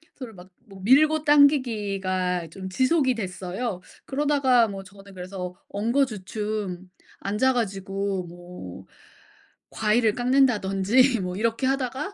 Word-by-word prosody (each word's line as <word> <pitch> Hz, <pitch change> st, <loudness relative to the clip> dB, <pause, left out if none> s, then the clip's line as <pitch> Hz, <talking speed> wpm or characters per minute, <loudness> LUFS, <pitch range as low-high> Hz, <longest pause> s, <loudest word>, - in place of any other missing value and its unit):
서로 255 Hz, -4 st, -9 dB
막 180 Hz, 0 st, -14 dB, 0.2 s
뭐 195 Hz, -1 st, -12 dB
밀고 300 Hz, +7 st, +4 dB
당기기가 205 Hz, -, +2 dB
좀 190 Hz, +3 st, -8 dB
지속이 260 Hz, -, +2 dB
됐어요. 190 Hz, 0 st, -4 dB, 0.2 s
그러다가 275 Hz, -4 st, +2 dB
뭐 195 Hz, -2 st, -7 dB
저는 195 Hz, +1 st, -15 dB
그래서 180 Hz, 0 st, -6 dB
엉거주춤 210 Hz, -5 st, -2 dB, 0.3 s
앉아 210 Hz, +7 st, +1 dB
가지고 195 Hz, -4 st, -2 dB
뭐 175 Hz, -, -10 dB, 0.9 s
과일을 220 Hz, 0 st, +2 dB
깎는다든지 245 Hz, -2 st, +2 dB
뭐 180 Hz, 0 st, -4 dB
이렇게 230 Hz, +4 st, 0 dB
하다가 270 Hz, +7 st, -2 dB
210 Hz, 255 characters per minute, -25 LUFS, 190-255 Hz, 0.9 s, 밀고